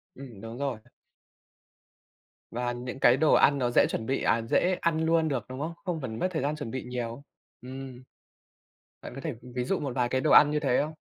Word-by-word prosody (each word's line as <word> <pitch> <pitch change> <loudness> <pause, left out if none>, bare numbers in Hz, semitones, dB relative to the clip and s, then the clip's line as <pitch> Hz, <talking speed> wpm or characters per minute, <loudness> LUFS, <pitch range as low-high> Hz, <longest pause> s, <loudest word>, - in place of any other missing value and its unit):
Ừm. 125 -7 -11
Đúng 115 +1 -8
rồi. 135 -5 -2 1.7
Và 120 +1 -2
những 125 +2 -6
cái 125 -1 +5
đồ 155 +2 +4
ăn 140 - +5
nó 125 -3 0
dễ - - +5
chuẩn 110 - -3
bị 135 +3 -1
à, 115 - +2
dễ 180 +10 +1
ăn 160 -1 +1
luôn 165 0 +3
được, 130 -7 -2
đúng 130 +1 -7
không? 160 +3 -3
Không 175 -4 -2
cần 115 -4 -5
mất 185 - +1
thời 160 - -2
gian 145 +3 -1
chuẩn 145 -7 -6
bị 130 - -4
nhiều. 125 +1 -5 0.4
Ừm, 130 0 -9 1.0
bạn - - -9
có 135 - -7
thể 155 -1 -3 0.2
ví 125 - 0
dụ 180 +9 -1
một 140 -4 -4
vài 125 -2 +1
cái 130 +1 0
đồ 155 - +1
ăn 150 - +8
như 150 - +1
thế 135 -4 +1
không? 155 +2 -4
130 Hz, 220 wpm, -28 LUFS, 120-150 Hz, 1.7 s, ăn